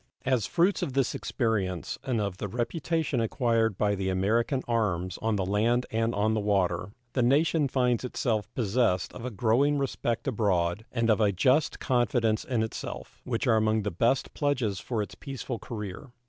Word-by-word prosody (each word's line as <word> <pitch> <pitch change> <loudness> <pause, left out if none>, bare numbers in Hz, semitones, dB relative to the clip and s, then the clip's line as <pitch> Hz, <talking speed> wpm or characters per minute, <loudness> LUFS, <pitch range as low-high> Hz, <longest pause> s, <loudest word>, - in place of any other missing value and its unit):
As 130 -5 +1
fruits 180 +4 +2
of 135 - -2
this 135 -2 +1
experience 100 - -2
and 125 -4 -1
of 100 -3 -2
the 105 - -3
reputation 140 - -1
acquired 115 -3 +1
by 105 -1 +2
the 95 -1 -1
American 115 +8 +1
arms 95 -6 -1
on 110 -1 +1
the 95 -2 0
land 115 +6 +1
and 115 +1 0
on 105 +2 +2
the 110 - +1
water, 100 -2 0 0.2
the 130 - +1
nation 150 +4 +3
finds 125 -3 +1
itself 110 -5 -1
possessed 110 -5 +1
of 120 - -8
a - - -2
growing 125 +7 +2
respect 130 -3 -2
abroad 100 -5 0
and 115 -2 +2
of 110 - +2
a 105 -2 +4
just 130 - +2
confidence 120 -3 +1
in 120 -4 0
itself, 110 - -6
which 120 0 -1
are 115 -3 +4
among 110 0 +2
the 105 - -2
best 120 +10 +1
pledges 125 - 0
for 115 -4 -2
its - - -9
peaceful 130 -3 -6
career. 105 +3 -7
115 Hz, 175 wpm, -28 LUFS, 105-125 Hz, 0.2 s, a